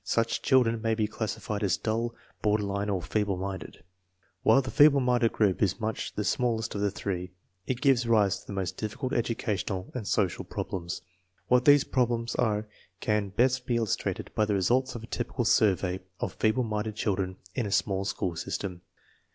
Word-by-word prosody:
Such 115 Hz, 0 st, 0 dB
children 120 Hz, -4 st, +3 dB
may 115 Hz, 0 st, +1 dB
be 110 Hz, -1 st, +1 dB
classified 105 Hz, -1 st, -3 dB
as 95 Hz, -4 st, +2 dB
dull, 115 Hz, +1 st, -1 dB, 0.3 s
border 105 Hz, 0 st, +2 dB
line, 100 Hz, +1 st, -2 dB
or 95 Hz, -4 st, -1 dB
feeble 100 Hz, +3 st, 0 dB
minded. 95 Hz, -2 st, -6 dB, 0.6 s
While 125 Hz, +5 st, +5 dB
the 130 Hz, -, -5 dB
feeble 145 Hz, -1 st, +6 dB
minded 125 Hz, -2 st, +2 dB
group 100 Hz, -4 st, +1 dB
is 100 Hz, 0 st, +1 dB
much 110 Hz, -1 st, -3 dB
the 105 Hz, -, -1 dB
smallest 115 Hz, +1 st, 0 dB
of 100 Hz, -, -3 dB
the 100 Hz, -, +2 dB
three, 95 Hz, -2 st, -4 dB, 0.3 s
it 130 Hz, -1 st, -2 dB
gives 130 Hz, -4 st, +3 dB
rise 105 Hz, -4 st, +3 dB
to -, -, -19 dB
the -, -, -6 dB
most 95 Hz, -1 st, -3 dB
difficult 125 Hz, +5 st, -3 dB
educational 105 Hz, -5 st, -2 dB
and 115 Hz, -6 st, -5 dB
social 95 Hz, -5 st, +1 dB
problems. 85 Hz, -1 st, -5 dB, 0.5 s
What 125 Hz, 0 st, +4 dB
these 145 Hz, -1 st, +7 dB
problems 120 Hz, -2 st, 0 dB
are 105 Hz, -2 st, 0 dB, 0.3 s
can 105 Hz, -2 st, 0 dB
best 125 Hz, +5 st, +1 dB
be 120 Hz, -, +1 dB
il 115 Hz, -, +2 dB
lustrated 105 Hz, -, -3 dB
by 110 Hz, -, +2 dB
the 105 Hz, -1 st, 0 dB
results 120 Hz, +8 st, +1 dB
of 115 Hz, -, -6 dB
a -, -, -6 dB
typical 120 Hz, +1 st, -3 dB
survey 95 Hz, -4 st, +3 dB, 0.2 s
of -, -, -3 dB
feeble 110 Hz, +4 st, +1 dB
minded 105 Hz, -1 st, -2 dB
children 95 Hz, -3 st, -1 dB, 0.2 s
in 115 Hz, -, -1 dB
a -, -, -5 dB
small 100 Hz, -1 st, +1 dB
school 90 Hz, -3 st, -2 dB
system. 90 Hz, +2 st, -4 dB
110 Hz, 185 wpm, -28 LUFS, 100-120 Hz, 0.6 s, these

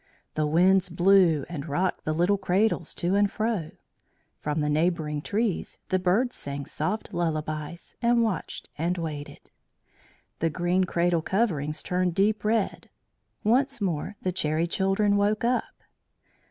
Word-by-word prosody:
The 155 Hz, -1 st, 0 dB
winds 180 Hz, +4 st, +4 dB
blew 175 Hz, -4 st, +4 dB
and 160 Hz, -3 st, -6 dB
rocked 180 Hz, +6 st, -1 dB
the 155 Hz, -, 0 dB
little 175 Hz, +5 st, +2 dB
cradles 195 Hz, +3 st, +1 dB
to 175 Hz, +1 st, 0 dB
and 200 Hz, 0 st, +3 dB
fro; 215 Hz, -8 st, -1 dB, 0.7 s
from 150 Hz, +1 st, -2 dB
the 150 Hz, -, 0 dB
neighbouring 155 Hz, -1 st, 0 dB
trees 210 Hz, +2 st, -2 dB
the 185 Hz, -, +2 dB
birds 205 Hz, +8 st, +1 dB
sang 140 Hz, 0 st, -5 dB
soft 205 Hz, +7 st, -3 dB
lullabies, 155 Hz, -1 st, -3 dB
and 235 Hz, 0 st, +3 dB
watched 215 Hz, -6 st, -3 dB
and 175 Hz, +3 st, 0 dB
waited. 150 Hz, -4 st, -6 dB, 0.9 s
The 165 Hz, -, +1 dB
green 180 Hz, +3 st, +1 dB
cradle 170 Hz, -1 st, +1 dB
coverings 160 Hz, -7 st, 0 dB
turned 180 Hz, -1 st, 0 dB
deep 205 Hz, +2 st, +2 dB
red. 215 Hz, -1 st, 0 dB, 0.5 s
Once 265 Hz, +4 st, +2 dB
more 190 Hz, 0 st, -2 dB
the 185 Hz, -, 0 dB
Cherry 160 Hz, -2 st, 0 dB
Children 195 Hz, +3 st, +1 dB
woke 210 Hz, +2 st, +1 dB
up. 245 Hz, +1 st, -1 dB
180 Hz, 140 wpm, -26 LUFS, 160-205 Hz, 0.9 s, winds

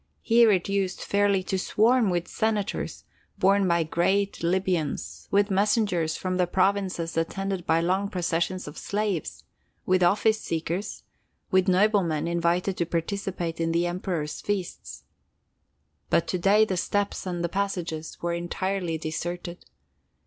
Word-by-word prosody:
Here 230 Hz, -1 st, +5 dB
it 185 Hz, -3 st, +1 dB
used 195 Hz, -1 st, -1 dB
fairly 200 Hz, -1 st, +2 dB
to 190 Hz, 0 st, -2 dB
swarm 225 Hz, +3 st, +3 dB
with 175 Hz, -1 st, -1 dB
senators, 215 Hz, -2 st, -2 dB, 0.3 s
borne 195 Hz, +1 st, +3 dB
by 170 Hz, -1 st, +3 dB
giant 195 Hz, +5 st, 0 dB
Libyans; 175 Hz, -3 st, -1 dB
with 200 Hz, +1 st, +2 dB
messengers 195 Hz, -5 st, +1 dB
from 185 Hz, -1 st, -2 dB
the 180 Hz, -1 st, +2 dB
provinces 185 Hz, -2 st, 0 dB
attended 190 Hz, +2 st, -2 dB
by 165 Hz, +1 st, +3 dB
long 190 Hz, +4 st, 0 dB
processions 180 Hz, 0 st, -1 dB
of 150 Hz, -, -8 dB
slaves; 205 Hz, -5 st, -2 dB, 0.4 s
with 185 Hz, 0 st, +2 dB
office 215 Hz, +5 st, +3 dB
seekers; 170 Hz, +5 st, -3 dB, 0.5 s
with 185 Hz, 0 st, +3 dB
noblemen 185 Hz, -5 st, +2 dB
invited 170 Hz, +2 st, 0 dB
to 170 Hz, -, +1 dB
participate 170 Hz, -1 st, -3 dB
in 165 Hz, 0 st, +1 dB
the 170 Hz, +1 st, +2 dB
Emperor's 175 Hz, -3 st, -3 dB
feasts. 200 Hz, -4 st, -4 dB, 1.1 s
But 170 Hz, -, +2 dB
to 185 Hz, -, -1 dB
day 205 Hz, +4 st, +5 dB
the 190 Hz, -4 st, -2 dB
steps 205 Hz, +2 st, -1 dB
and 175 Hz, -1 st, -1 dB
passages 175 Hz, -5 st, -3 dB
were 170 Hz, 0 st, 0 dB
entirely 175 Hz, 0 st, -2 dB
deserted. 175 Hz, +3 st, -5 dB
185 Hz, 135 wpm, -26 LUFS, 170-200 Hz, 1.1 s, Here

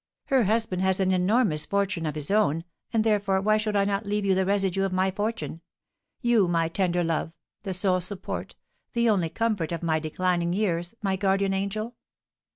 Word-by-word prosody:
Her 265 Hz, -4 st, +2 dB
husband 215 Hz, -3 st, 0 dB
has 190 Hz, 0 st, +2 dB
an 190 Hz, -1 st, +2 dB
enormous 185 Hz, -3 st, +2 dB
fortune 200 Hz, -4 st, 0 dB
of 150 Hz, -, -3 dB
his 150 Hz, +3 st, -2 dB
own; 165 Hz, -6 st, +2 dB, 0.3 s
and, 225 Hz, -2 st, +2 dB
therefore, 205 Hz, -3 st, +2 dB
why 215 Hz, +2 st, +3 dB
should 215 Hz, -1 st, -1 dB
I 200 Hz, -1 st, +3 dB
not 200 Hz, +1 st, -1 dB
leave 205 Hz, 0 st, -1 dB
you 195 Hz, -, +3 dB
the 190 Hz, 0 st, +1 dB
residue 195 Hz, -1 st, +1 dB
of 195 Hz, -1 st, 0 dB
my 185 Hz, +1 st, +1 dB
fortune, 205 Hz, -4 st, -3 dB, 0.6 s
you, 235 Hz, -5 st, +4 dB
my 165 Hz, -1 st, +1 dB
tender 175 Hz, 0 st, 0 dB
love, 165 Hz, 0 st, -1 dB, 0.3 s
the 190 Hz, -3 st, -2 dB
sole 185 Hz, 0 st, +2 dB
support, 185 Hz, +2 st, -3 dB, 0.4 s
the 235 Hz, 0 st, +2 dB
only 190 Hz, -7 st, +2 dB
comfort 205 Hz, -3 st, -1 dB
of 170 Hz, 0 st, -4 dB
my 160 Hz, -1 st, +1 dB
declining 175 Hz, +2 st, -1 dB
years, 180 Hz, -2 st, -1 dB
my 190 Hz, -1 st, 0 dB
guardian 195 Hz, 0 st, +1 dB
angel?' 215 Hz, +4 st, -3 dB
190 Hz, 185 wpm, -26 LUFS, 175-210 Hz, 0.6 s, you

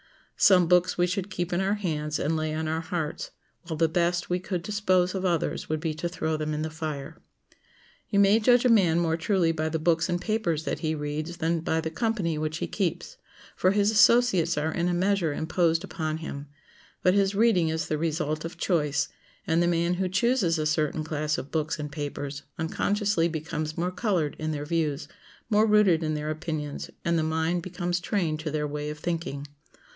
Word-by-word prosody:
Some 185 Hz, -3 st, +6 dB
books 180 Hz, +1 st, +3 dB
we 175 Hz, -, +3 dB
should 185 Hz, +2 st, -2 dB
keep 175 Hz, -2 st, -3 dB
in 175 Hz, -, +1 dB
our 195 Hz, +2 st, +1 dB
hands 155 Hz, -6 st, -2 dB
and 160 Hz, +3 st, 0 dB
lay 155 Hz, 0 st, -1 dB
on 160 Hz, 0 st, -2 dB
our 160 Hz, +1 st, -1 dB
hearts, 160 Hz, -2 st, -4 dB, 0.4 s
while 160 Hz, -3 st, -3 dB
the 165 Hz, +1 st, +3 dB
best 175 Hz, +1 st, 0 dB
we 180 Hz, -, +1 dB
could 180 Hz, -2 st, -4 dB
dispose 185 Hz, -3 st, +1 dB
of 190 Hz, -1 st, -3 dB
others 175 Hz, -4 st, -1 dB
would 155 Hz, 0 st, 0 dB
be 160 Hz, -1 st, -2 dB
to 165 Hz, +3 st, -3 dB
throw 160 Hz, -2 st, -2 dB
them 155 Hz, 0 st, -2 dB
in 155 Hz, -, -2 dB
the 160 Hz, -, -3 dB
fire. 155 Hz, -1 st, -6 dB, 0.9 s
You 200 Hz, -, 0 dB
may 200 Hz, +2 st, +5 dB
judge 245 Hz, +2 st, +4 dB
a -, -, +5 dB
man 185 Hz, -8 st, +4 dB
more 165 Hz, -2 st, +1 dB
truly 170 Hz, 0 st, +1 dB
by 160 Hz, -1 st, -1 dB
the 160 Hz, -, -1 dB
books 160 Hz, +1 st, +1 dB
and 175 Hz, 0 st, 0 dB
papers 180 Hz, -6 st, -1 dB
that -, -, -2 dB
he 160 Hz, -1 st, -1 dB
reads 155 Hz, +3 st, -4 dB
than 165 Hz, 0 st, 0 dB
by 160 Hz, 0 st, 0 dB
the 160 Hz, 0 st, -3 dB
company 190 Hz, -6 st, -1 dB
which 155 Hz, +1 st, -2 dB
he -, -, -2 dB
keeps, 200 Hz, -, -3 dB, 0.4 s
for 185 Hz, -, +3 dB
his 205 Hz, +2 st, +3 dB
associates 220 Hz, -6 st, +4 dB
are 155 Hz, +2 st, 0 dB
in 170 Hz, +2 st, -1 dB
a 180 Hz, -, +1 dB
measure 185 Hz, -3 st, +1 dB
imposed 165 Hz, +2 st, +1 dB
upon 155 Hz, -5 st, -3 dB
him; 145 Hz, -3 st, -7 dB, 0.6 s
but 180 Hz, -, +5 dB
his 200 Hz, 0 st, +2 dB
reading 205 Hz, -7 st, +3 dB
is 160 Hz, 0 st, -2 dB
the 155 Hz, -, -1 dB
result 155 Hz, -1 st, -1 dB
of 165 Hz, +1 st, -6 dB
choice; 150 Hz, -5 st, 0 dB, 0.4 s
and 165 Hz, +1 st, +2 dB
the 175 Hz, -, +3 dB
man 170 Hz, 0 st, +1 dB
who 185 Hz, +1 st, -1 dB
chooses 195 Hz, -3 st, +2 dB
a 155 Hz, -, -1 dB
certain 155 Hz, 0 st, 0 dB
class 155 Hz, -1 st, -1 dB
of 135 Hz, -, -7 dB
books 155 Hz, 0 st, -1 dB
and 150 Hz, -1 st, -5 dB
papers 145 Hz, -1 st, -5 dB, 0.2 s
unconsciously 200 Hz, +2 st, +1 dB
becomes 155 Hz, -1 st, -4 dB
more 175 Hz, +2 st, -1 dB
colored 180 Hz, -7 st, 0 dB
in 155 Hz, 0 st, -2 dB
their 145 Hz, -1 st, -4 dB
views, 155 Hz, -2 st, -1 dB, 0.4 s
more 215 Hz, +1 st, +4 dB
rooted 210 Hz, -6 st, +4 dB
in 155 Hz, -1 st, -1 dB
their 150 Hz, 0 st, -2 dB
opinions, 155 Hz, -2 st, -4 dB, 0.2 s
and 170 Hz, -1 st, +2 dB
the -, -, +1 dB
mind 160 Hz, +2 st, 0 dB
becomes 175 Hz, 0 st, -2 dB
trained 170 Hz, -4 st, -1 dB
to 155 Hz, 0 st, -3 dB
their 150 Hz, 0 st, -1 dB
way 150 Hz, 0 st, -4 dB
of 150 Hz, -, -6 dB
thinking. 165 Hz, -3 st, -3 dB
165 Hz, 205 wpm, -27 LUFS, 155-185 Hz, 0.9 s, Some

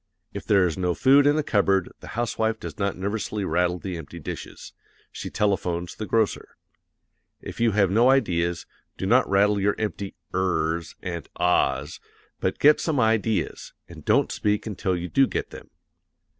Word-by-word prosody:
If -, -, -6 dB
there 100 Hz, -3 st, +4 dB
is 85 Hz, +1 st, -2 dB
no 90 Hz, -2 st, 0 dB
food 140 Hz, +2 st, +5 dB
in 145 Hz, -, +4 dB
the 155 Hz, -, +1 dB
cupboard 100 Hz, -6 st, +1 dB
the -, -, -12 dB
housewife 110 Hz, -1 st, -1 dB
does -, -, -8 dB
not 100 Hz, -2 st, -1 dB
nervously 100 Hz, +1 st, -3 dB
rattle 90 Hz, +1 st, +1 dB
the 90 Hz, -1 st, -5 dB
empty 80 Hz, +1 st, -9 dB
dishes; 75 Hz, -, -8 dB, 0.4 s
she -, -, -6 dB
telephones 90 Hz, -4 st, -1 dB
the 110 Hz, -, -6 dB
grocer. 110 Hz, +2 st, -1 dB, 0.8 s
If -, -, -9 dB
you 115 Hz, -2 st, +2 dB
have 100 Hz, -3 st, +3 dB
no 115 Hz, +5 st, +4 dB
ideas, 85 Hz, -10 st, +1 dB, 0.3 s
do -, -, -3 dB
not 125 Hz, +6 st, +3 dB
rattle 100 Hz, +1 st, +3 dB
your 100 Hz, +1 st, +2 dB
empty 105 Hz, -2 st, -4 dB, 0.2 s
ers 85 Hz, -3 st, -1 dB
and 85 Hz, -2 st, -5 dB
ahs, 85 Hz, -4 st, +1 dB, 0.4 s
but -, -, -1 dB
get 150 Hz, +1 st, +5 dB
some 155 Hz, -5 st, 0 dB
ideas, 110 Hz, -2 st, 0 dB
and -, -, -12 dB
don't -, -, +2 dB
speak 105 Hz, 0 st, -1 dB
until 95 Hz, -3 st, -2 dB
you 85 Hz, +1 st, -4 dB
do 135 Hz, +8 st, +3 dB
get -, -, -4 dB
them. -, -, -11 dB
100 Hz, 170 wpm, -25 LUFS, 90-110 Hz, 0.8 s, food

